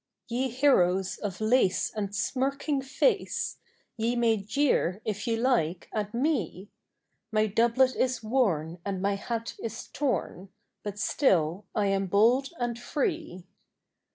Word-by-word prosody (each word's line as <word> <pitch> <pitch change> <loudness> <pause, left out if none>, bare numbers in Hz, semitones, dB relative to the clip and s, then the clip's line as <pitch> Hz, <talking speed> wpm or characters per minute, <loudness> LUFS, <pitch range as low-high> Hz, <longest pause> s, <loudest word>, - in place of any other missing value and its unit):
Ye 250 +3 -1
heroes 195 -8 +2
of 195 -4 -4
lace 220 -3 +2
and 205 -1 -3
smirking 275 +5 -1
face. 395 - 0 0.4
Ye 230 +2 0
may 230 -2 +3
jeer, 210 -3 +1
if 210 0 -3
ye 230 - +2
like, 225 -9 0
at 210 -1 -2
me; 240 - -1 0.6
My 215 0 +3
doublet 235 +5 +3
is 255 -2 0
worn 185 - 0
and 195 -2 -3
my 200 +2 +1
hat 230 +3 -4
is 230 - -6
torn, 245 -9 -2 0.3
But 205 -1 -6
still 190 - +1
I 210 - +2
am 195 -1 +1
bold 235 +8 +3
and 240 -1 -2
free. 295 - -3
225 Hz, 130 wpm, -28 LUFS, 195-255 Hz, 0.6 s, may